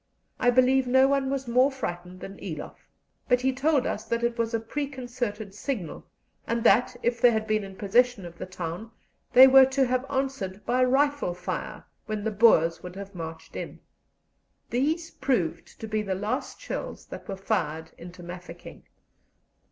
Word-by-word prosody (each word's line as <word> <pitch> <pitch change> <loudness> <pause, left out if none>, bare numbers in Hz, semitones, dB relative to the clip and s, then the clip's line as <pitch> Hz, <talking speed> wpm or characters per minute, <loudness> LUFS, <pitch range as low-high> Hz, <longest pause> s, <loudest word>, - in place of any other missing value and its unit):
I 245 - +4
believe 255 +1 +4
no 260 +2 +5
one 275 -1 +1
was 270 -1 -2
more 250 +3 +4
frightened 180 -8 -6
than 195 0 -8
Eloff; 160 -6 -8 0.4
but 250 0 +4
he 265 +1 +1
told 275 0 +2
us 215 - -2
that 235 0 -2
it 235 0 +1
was 230 -1 -1
a - - +1
preconcerted 245 -5 -4
signal, 205 - -5 0.4
and 230 0 -1
that, 245 +1 +4
if 240 0 0
they 245 - +8
had 220 -2 0
been 215 -1 0
in 195 -1 -9
possession 225 +1 +2
of 170 0 -11
the - - -5
town, 180 +3 -6 0.4
they 260 +1 +10
were 265 0 +8
to 265 0 +2
have 255 +2 -1
answered 265 -8 -3
by 250 +1 +2
rifle 275 -6 +2
fire, - - -5 0.2
when 215 -2 -3
the 220 - -1
Boers 195 -7 +4
would 180 0 -9
have 200 0 -8
marched 165 -2 -8
in. - - -6 0.9
These 315 +7 0
proved 170 - -2
to 220 - -6
be 215 0 -1
the 195 -2 -2
last 205 +3 -3
shells - - -6
that - - -10
were 195 - -5
fired 160 -4 -2
into 175 +1 -11
Mafeking. 180 +1 -10
230 Hz, 175 wpm, -27 LUFS, 190-260 Hz, 0.9 s, they